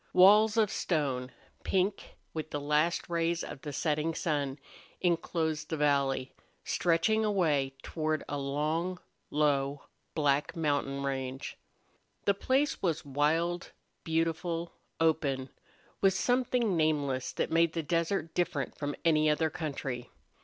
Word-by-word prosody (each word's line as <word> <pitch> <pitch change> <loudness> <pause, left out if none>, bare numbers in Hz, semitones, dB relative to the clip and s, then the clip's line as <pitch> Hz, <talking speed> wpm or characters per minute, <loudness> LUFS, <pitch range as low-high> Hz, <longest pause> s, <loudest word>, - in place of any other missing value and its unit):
Walls 210 +4 +7
of 215 -3 +3
stone, 135 -6 -1 0.3
pink 195 +1 -1 0.2
with 155 -1 -4
the 145 - -3
last 150 +4 +1
rays 170 0 0
of 135 - -7
the 150 - -5
setting 155 +2 0
sun, 145 -5 -1 0.4
inclosed 160 -3 0
the 160 - -2
valley, 140 -3 +1 0.3
stretching 180 +6 +2
away 155 -10 +1
toward 155 -1 -1
a 145 - -3
long, 155 +6 -1 0.3
low, 145 -1 +1 0.3
black 145 -2 +1
mountain 145 -3 0
range. 130 -1 -3 0.7
The 200 - +4
place 265 +8 +1
was 165 -4 0
wild, 160 +5 0 0.3
beautiful, 165 +1 -1 0.3
open, 140 -5 +1 0.5
with 195 -1 +4
something 245 -3 +1
nameless 145 -5 +1
that - - -1
made 165 0 +3
the 165 - -2
desert 165 +1 0
different 170 -6 -1
from 145 -1 -2
any 155 -2 +4
other 155 +1 +1
country. 135 -6 -4
155 Hz, 125 wpm, -30 LUFS, 145-170 Hz, 0.7 s, Walls